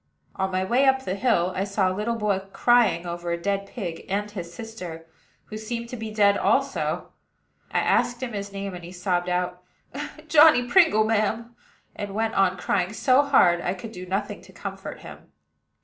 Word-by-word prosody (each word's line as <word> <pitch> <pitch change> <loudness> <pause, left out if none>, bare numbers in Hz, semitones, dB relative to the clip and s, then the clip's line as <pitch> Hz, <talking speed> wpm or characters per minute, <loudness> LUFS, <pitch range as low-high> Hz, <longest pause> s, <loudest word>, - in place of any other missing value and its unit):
On 190 0 -1
my 185 0 0
way 245 +8 +2
up 265 0 +3
the 185 - -1
hill, 195 -4 +1
I 190 - 0
saw 195 -2 0
a - - -2
little 210 +4 -2
boy 210 -3 0
crying 235 -8 +3
over 175 0 -5
a 170 - -1
dead 200 +2 -2
pig, 175 -9 -6
and 205 +2 -2
his 175 -5 -7
sister, 175 -5 -8 0.4
who 215 - -7
seemed 235 +1 -5
to 250 - -5
be 225 -2 -5
dead 205 -1 +3
also. - - 0 0.6
I - - +1
asked 245 0 +1
his 205 -5 -4
name, 195 -1 -5
and 175 -1 -8
he 175 - -9
sobbed 180 -1 -1
out, 180 0 -1 0.7
"Johnny 300 -4 +7
Pringle, 325 - +5
ma'am;" 225 +2 -1 0.4
and 200 -1 -6
went 225 +1 0
on 190 -1 +2
crying 180 +1 -1
so 255 +4 +4
hard 180 -12 +4
I 180 +2 -2
could 215 +4 -8
do 185 -3 -9
nothing 200 +2 -3
to - - -16
comfort - - -7
him. - - -12
200 Hz, 185 wpm, -25 LUFS, 180-230 Hz, 0.7 s, Johnny